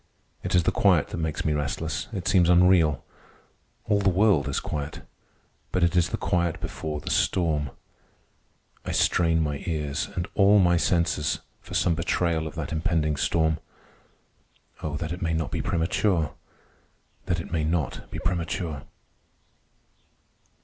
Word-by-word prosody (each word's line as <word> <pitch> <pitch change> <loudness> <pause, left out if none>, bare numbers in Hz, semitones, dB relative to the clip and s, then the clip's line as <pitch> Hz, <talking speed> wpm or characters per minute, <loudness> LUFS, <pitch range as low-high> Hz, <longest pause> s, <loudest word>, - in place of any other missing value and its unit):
It - - -1
is 90 - +4
the - - +2
quiet - - +3
that - - -5
makes 80 -2 -3
me 80 - +2
restless. 75 +2 -2
It 95 -6 -4
seems 90 -3 +4
unreal. 90 -5 +4 0.8
All 105 -1 +2
the 100 -1 +3
world 95 -6 +3
is 70 - 0
quiet, 75 0 -5 0.7
but 90 - +1
it 85 0 +2
is 90 0 +3
the - - -2
quiet 85 -2 0
before 75 -1 -4
the - - -5
storm. 75 -6 +1 1.1
I - - -4
strain 80 -2 +3
my 75 -2 -3
ears, 75 +1 -2
and 90 0 -2
all 100 +1 +5
my 90 -3 +4
senses, 85 -3 +1 0.2
for - - -9
some 85 - +3
betrayal 80 -1 0
of 80 - -9
that 80 -4 -4
impending 80 -1 0
storm. 80 +1 +1 1.2
Oh, 75 -1 -3
that 80 +1 -4
it 90 - -8
may 80 -2 0
not 80 -2 -2
be - - -2
premature! 80 - 0 0.9
That 85 - 0
it 85 - -8
may 80 -2 0
not 80 -4 -2
be - - -6
premature! 85 -3 -2
80 Hz, 150 wpm, -26 LUFS, 75-90 Hz, 1.2 s, all